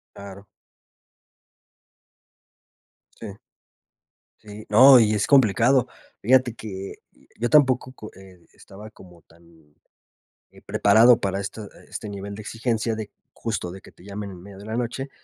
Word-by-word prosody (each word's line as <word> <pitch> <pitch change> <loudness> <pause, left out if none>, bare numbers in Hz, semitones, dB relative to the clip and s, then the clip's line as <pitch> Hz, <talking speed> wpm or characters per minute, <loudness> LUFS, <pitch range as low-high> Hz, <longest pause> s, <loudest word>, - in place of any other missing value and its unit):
Claro. 100 0 -12 2.8
Sí. 105 -3 -9 1.0
Sí, 105 0 -12
no, 130 +4 +7
y 110 -1 +2
es 105 - -1
complicado. 125 -1 +3 0.3
Fíjate 125 +1 +2
que 95 -4 -8 0.5
yo 120 - -1
tampoco 130 -4 +3
co 110 -4 -11
eh 95 -2 -17
estaba 105 +2 -14
como 90 -5 -18
tan, 80 -3 -24 0.8
eh, - - -19
preparado 115 +4 +4
para 95 0 -3
esta 100 +1 -7 0.2
este 105 - -8
nivel 100 0 -8
de 110 - -9
exigencia 115 0 -3
de 110 -2 -7 0.2
justo 105 -6 -5
de 95 - -11
que - - -17
te - - -21
llamen 100 +1 -7
en 90 -2 -12
medio 100 -1 -13
de 100 - -12
la 110 +1 -5
noche, 125 +3 -4
105 Hz, 140 wpm, -23 LUFS, 95-115 Hz, 2.8 s, no